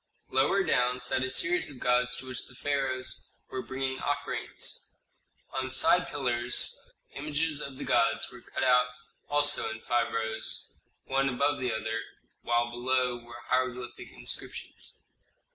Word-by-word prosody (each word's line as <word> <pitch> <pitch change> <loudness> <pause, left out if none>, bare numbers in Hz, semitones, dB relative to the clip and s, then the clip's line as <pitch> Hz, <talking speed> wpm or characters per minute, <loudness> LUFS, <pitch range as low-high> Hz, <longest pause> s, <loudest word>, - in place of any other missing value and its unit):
Lower 145 +10 +3
down 125 -6 +2
sat 125 +1 0
a 130 - 0
series 170 +7 +4
of 135 -3 -5
gods 125 0 +2
to - - -6
which 130 -2 -4
the 125 - -14
pharaohs 135 -2 -1 0.2
were 130 - -2
bringing 130 0 -3
offerings. 145 0 -2 0.6
On 130 -1 -1
side 150 +7 +4
pillars 125 -3 +1 0.2
images 150 +1 0
of 135 -1 -6
the - - -5
gods 115 0 +2
were 120 - -11
cut - - -4
out 125 -1 +5 0.4
also 145 -2 +3
in 110 0 -5
five 120 +1 +1
rows, 110 0 0 0.3
one 135 +1 +2
above 140 +3 +1
the 125 -2 0
other, 110 +1 -2 0.4
while 120 0 +1
below 125 0 +1
were 120 0 -11
hieroglyphic 125 -1 -1
inscriptions. - - -6
130 Hz, 145 wpm, -29 LUFS, 120-135 Hz, 0.6 s, out